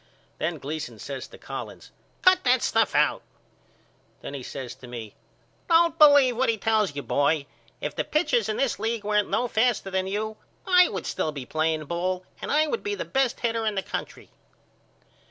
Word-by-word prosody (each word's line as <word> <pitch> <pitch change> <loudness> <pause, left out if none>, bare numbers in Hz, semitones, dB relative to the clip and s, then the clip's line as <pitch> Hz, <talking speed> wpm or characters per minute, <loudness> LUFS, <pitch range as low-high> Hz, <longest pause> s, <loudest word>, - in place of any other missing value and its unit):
Then 165 0 -1
Gleason 145 -4 -5
says 135 +5 -6
to - - -14
Collins - - -8 0.3
Cut 370 0 +5
that 250 -1 +3
stuff 225 -2 +2
out. 150 0 +3 1.0
Then - - -7
he 140 - -5
says 125 -1 -7
to 130 0 -13
me 115 -4 -8 0.6
Don't 335 0 +4
believe 285 -5 +7
what 260 0 +2
he 225 - +1
tells 215 -6 +1
you 140 - -4
boy. 145 0 +1 0.4
If - - -3
the - - 0
pitchers 355 - +1
in 215 - -1
this 270 -4 0
league 225 -1 -2
weren't 210 0 +1
no 245 - +1
faster 230 -3 +1
than 190 0 0
you 215 +2 -3 0.3
I 360 -1 +6
would 190 -4 -5
still 155 - -1
be 140 -4 -7
playing 155 +2 -1
ball 180 +3 -2 0.2
and - - -4
I 305 +1 +4
would 385 +9 -2
be 415 0 -2
the - - -4
best 265 -2 0
hitter 230 -1 0
in 215 -2 0
the 195 - -1
country. - - -6
210 Hz, 190 wpm, -26 LUFS, 155-255 Hz, 1.0 s, believe